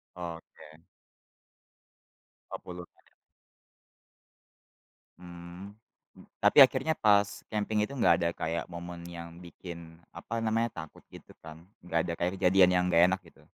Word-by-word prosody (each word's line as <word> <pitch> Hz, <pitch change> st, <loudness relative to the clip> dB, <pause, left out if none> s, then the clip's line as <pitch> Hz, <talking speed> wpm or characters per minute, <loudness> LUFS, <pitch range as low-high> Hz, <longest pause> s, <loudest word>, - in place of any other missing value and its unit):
Oke. 80 Hz, -2 st, -10 dB, 1.7 s
Oh -, -, -4 dB
puluhan. 90 Hz, -1 st, -9 dB, 2.3 s
Mmm, 90 Hz, +3 st, -11 dB, 0.6 s
tapi -, -, +3 dB
akhirnya 135 Hz, +4 st, +3 dB
pas 100 Hz, -5 st, +2 dB
camping 105 Hz, 0 st, -1 dB
itu -, -, -11 dB
enggak 125 Hz, -, +4 dB
ada 85 Hz, 0 st, +1 dB
kayak 85 Hz, +1 st, -3 dB
momen 85 Hz, 0 st, -8 dB
yang 85 Hz, -1 st, -9 dB
bikin 85 Hz, -1 st, -11 dB, 0.2 s
apa 115 Hz, -, -5 dB
namanya 115 Hz, +1 st, 0 dB, 0.2 s
takut -, -, -20 dB
gitu -, -, -14 dB
kan? 80 Hz, +1 st, -12 dB, 0.2 s
Enggak 85 Hz, -1 st, -1 dB
ada 85 Hz, -, -2 dB
kayak 90 Hz, +1 st, 0 dB
kejadian 90 Hz, 0 st, +5 dB
yang 90 Hz, -, +2 dB
enggak 85 Hz, -1 st, +4 dB
enak 95 Hz, 0 st, -1 dB
gitu? -, -, -20 dB
90 Hz, 125 wpm, -29 LUFS, 85-100 Hz, 2.3 s, kejadian